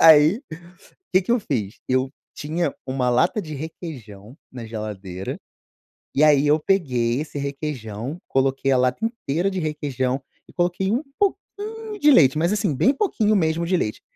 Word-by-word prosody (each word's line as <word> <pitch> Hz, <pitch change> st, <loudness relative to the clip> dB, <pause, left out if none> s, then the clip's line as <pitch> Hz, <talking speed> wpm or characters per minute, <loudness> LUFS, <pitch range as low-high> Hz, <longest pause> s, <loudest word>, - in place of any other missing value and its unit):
Aí 160 Hz, -, +7 dB, 0.7 s
que 185 Hz, -, +6 dB
que 190 Hz, -, -5 dB
eu 245 Hz, -, +3 dB
fiz 110 Hz, -, -3 dB
eu 130 Hz, +1 st, +1 dB, 0.2 s
tinha 165 Hz, +4 st, -2 dB
uma 130 Hz, -1 st, 0 dB
lata 170 Hz, -, +2 dB
de 155 Hz, -2 st, -7 dB
requeijão 130 Hz, -, -8 dB, 0.2 s
na 120 Hz, -3 st, -7 dB
geladeira 100 Hz, -4 st, -5 dB, 0.8 s
e 145 Hz, -, +4 dB
aí 150 Hz, -2 st, +5 dB
eu 150 Hz, +2 st, +4 dB
peguei 125 Hz, -10 st, +1 dB
esse 150 Hz, -1 st, -6 dB
requeijão 140 Hz, -2 st, -4 dB
coloquei 135 Hz, 0 st, +1 dB
a 130 Hz, -, +4 dB
lata 125 Hz, -, +1 dB
inteira 195 Hz, -, -1 dB
de 190 Hz, -, -2 dB
requeijão 135 Hz, -4 st, -2 dB, 0.3 s
e -, -, -17 dB
coloquei 180 Hz, +2 st, 0 dB
um 240 Hz, +5 st, +1 dB, 0.2 s
pouquinho 405 Hz, -1 st, +3 dB, 0.6 s
de 295 Hz, -, +7 dB
leite, 150 Hz, -, +6 dB
mas 170 Hz, +5 st, +2 dB
assim, 200 Hz, -8 st, 0 dB
bem 260 Hz, -, +4 dB
pouquinho 225 Hz, -, +1 dB
mesmo 165 Hz, -2 st, +1 dB
de 185 Hz, -, +1 dB
leite 105 Hz, -, -2 dB
150 Hz, 160 wpm, -23 LUFS, 125-175 Hz, 0.8 s, Aí